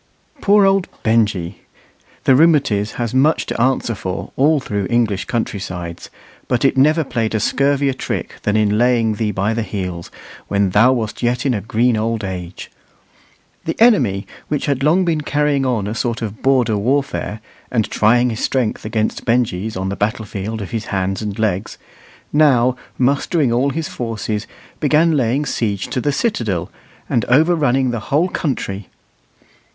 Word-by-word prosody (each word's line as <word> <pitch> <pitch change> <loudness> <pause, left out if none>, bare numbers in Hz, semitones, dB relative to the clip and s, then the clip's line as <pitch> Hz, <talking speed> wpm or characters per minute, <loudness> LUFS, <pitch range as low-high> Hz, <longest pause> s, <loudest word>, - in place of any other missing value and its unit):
Poor 205 0 +5
old 195 -1 +2 0.2
Benjy! 105 -6 0 0.6
The 135 - +5
"rheumatiz" 135 -9 +3
has 120 -1 -3
much 140 +5 +3
to - - -3
answer 130 -2 +1
for 95 -2 -5
all 150 +3 +3
through 100 -6 -3
English 115 -5 +1
country 115 -3 -2
sides, 90 -3 -7 0.4
but 125 +2 +1
it 135 - +3
never 155 +4 +4
played 115 -5 -2
a - - +1
scurvier 140 +4 +1
trick - - -4
than 105 0 +1
in 105 0 +2
laying 120 -2 +3
thee 105 0 -1
by 100 +2 0
the 115 - -1
heels, 90 -5 -5 0.4
when 100 -2 +1
thou 115 +6 +5
wast 115 -4 -2
yet 120 +2 0
in 135 - +2
a 105 - -2
green 115 +3 +1
old 110 0 -1
age. 90 -2 -6 0.9
The 160 - -3
enemy, 130 - +4 0.2
which 150 -2 -2
had 140 -2 -1
long 165 +6 +3
been 160 -3 0
carrying 145 -2 +1
on 115 -6 0
a 105 - -3
sort 115 +1 -2
of 105 -1 -6
border 125 -5 +2
warfare, 130 -1 -1 0.3
and 115 -4 0
trying 120 +3 +3
his 110 - -4
strength 125 -5 -1
against 110 0 -2
Benjy's 110 -4 0
on 95 +1 -2
the 100 - -3
battlefield 105 0 -3
of 95 - -9
his 115 -2 -3
hands 95 0 -2
and 105 -2 -4
legs, 110 -2 -1 0.6
now, 130 -5 +4 0.2
mustering 140 +2 +1
all 130 +4 +2
his 160 +3 -3
forces, 110 -3 -4 0.3
began 155 +2 +3
laying 135 +2 +1
siege 100 -7 -2
to 130 - -2
the 145 - +1
citadel, 110 - -1 0.4
and 115 - +1
overrunning 135 -3 +3
the 120 - -2
whole 160 +6 +2
country. 105 - -3
115 Hz, 165 wpm, -18 LUFS, 105-140 Hz, 0.9 s, Poor